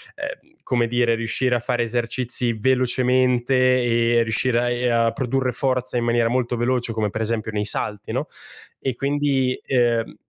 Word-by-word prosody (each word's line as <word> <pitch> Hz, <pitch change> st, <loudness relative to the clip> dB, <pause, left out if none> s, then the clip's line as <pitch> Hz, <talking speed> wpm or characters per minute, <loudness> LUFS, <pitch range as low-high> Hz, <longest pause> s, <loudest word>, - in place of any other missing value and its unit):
ehm, 285 Hz, +2 st, -7 dB
come 120 Hz, -2 st, +1 dB
dire, 120 Hz, -1 st, +2 dB
riuscire 120 Hz, +2 st, -1 dB
a -, -, +1 dB
fare 120 Hz, 0 st, -1 dB
esercizi 120 Hz, +1 st, -1 dB
velocemente 125 Hz, +1 st, +1 dB
e 120 Hz, -2 st, +3 dB
riuscire 115 Hz, +2 st, 0 dB
a 120 Hz, 0 st, 0 dB
e 120 Hz, 0 st, 0 dB
a 115 Hz, -1 st, +2 dB
produrre 130 Hz, -1 st, -1 dB
forza 130 Hz, 0 st, -1 dB
in 120 Hz, -, 0 dB
maniera 120 Hz, -1 st, +2 dB
molto 125 Hz, -1 st, 0 dB
veloce, 120 Hz, 0 st, 0 dB
come 105 Hz, -2 st, -1 dB
per 110 Hz, -, -3 dB
esempio 110 Hz, -1 st, -2 dB
nei 105 Hz, -1 st, -2 dB
salti, 105 Hz, -1 st, -3 dB
no? -, -, -1 dB, 0.5 s
E 130 Hz, -3 st, -2 dB
quindi, 140 Hz, -2 st, 0 dB
ehm 120 Hz, -3 st, +1 dB
120 Hz, 165 wpm, -22 LUFS, 115-130 Hz, 0.5 s, e